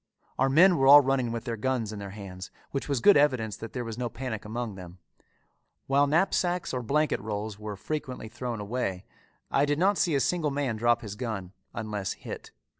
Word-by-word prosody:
Our 135 Hz, +1 st, +3 dB
men 175 Hz, +6 st, +6 dB
were 135 Hz, -1 st, +3 dB
all 145 Hz, +1 st, +10 dB
running 130 Hz, -3 st, 0 dB
with 115 Hz, -1 st, -4 dB
their 115 Hz, -2 st, -2 dB
guns 115 Hz, -2 st, -1 dB
in 105 Hz, -, -6 dB
their 100 Hz, -1 st, -6 dB
hands, 95 Hz, -2 st, -8 dB, 0.2 s
which 140 Hz, +1 st, -3 dB
was 135 Hz, -4 st, 0 dB
good 205 Hz, -, +7 dB
evidence 130 Hz, -8 st, +2 dB
that 115 Hz, -, -8 dB
there 125 Hz, -, -3 dB
was 115 Hz, +1 st, -6 dB
no 120 Hz, -1 st, -1 dB
panic 115 Hz, -4 st, -5 dB
among 115 Hz, 0 st, -4 dB
them. 90 Hz, -1 st, -10 dB, 0.9 s
While 140 Hz, +1 st, +3 dB
knapsacks 175 Hz, +1 st, +1 dB
or 125 Hz, -, -1 dB
blanket 150 Hz, +6 st, +1 dB
rolls 105 Hz, 0 st, -4 dB
were 105 Hz, -1 st, -5 dB
frequently 130 Hz, +1 st, -5 dB
thrown 120 Hz, 0 st, -5 dB
away, 100 Hz, -3 st, -3 dB, 0.5 s
I 140 Hz, -, +3 dB
did 145 Hz, 0 st, +1 dB
not 195 Hz, +4 st, +2 dB
see 175 Hz, -6 st, +2 dB
a -, -, +3 dB
single 160 Hz, +3 st, +1 dB
man 140 Hz, -4 st, -1 dB
drop 120 Hz, +2 st, +2 dB
his 105 Hz, -2 st, -6 dB
gun 105 Hz, -5 st, -5 dB, 0.2 s
unless 105 Hz, -4 st, -3 dB
hit. -, -, -8 dB
120 Hz, 200 wpm, -28 LUFS, 105-140 Hz, 0.9 s, all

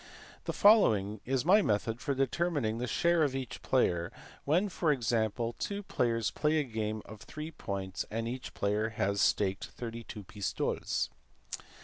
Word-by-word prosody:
The -, -, -1 dB
following 110 Hz, -, +4 dB
is 130 Hz, +1 st, 0 dB
my 200 Hz, +5 st, +6 dB
method 115 Hz, -, 0 dB
for 140 Hz, -, -1 dB
determining 135 Hz, -4 st, 0 dB
the 125 Hz, -, -2 dB
share 170 Hz, +5 st, +2 dB
of 140 Hz, -4 st, +2 dB
each 130 Hz, -3 st, -5 dB
player, 85 Hz, -1 st, +1 dB, 0.3 s
when, 175 Hz, +8 st, +3 dB
for 170 Hz, -4 st, +1 dB
example, 115 Hz, -2 st, 0 dB
two 200 Hz, 0 st, -3 dB
players 115 Hz, -, 0 dB
play 150 Hz, 0 st, +1 dB
a 150 Hz, -, +2 dB
game 110 Hz, -3 st, -3 dB
of 110 Hz, -1 st, -11 dB
three 155 Hz, +1 st, -7 dB
points 95 Hz, -, -4 dB
and 115 Hz, +1 st, -2 dB
each 125 Hz, +2 st, -6 dB
player 105 Hz, +2 st, 0 dB
has 100 Hz, -2 st, 0 dB
staked 95 Hz, 0 st, +1 dB
32 115 Hz, -3 st, -7 dB
pistoles. 100 Hz, +1 st, -2 dB
115 Hz, 150 wpm, -31 LUFS, 105-150 Hz, 0.3 s, my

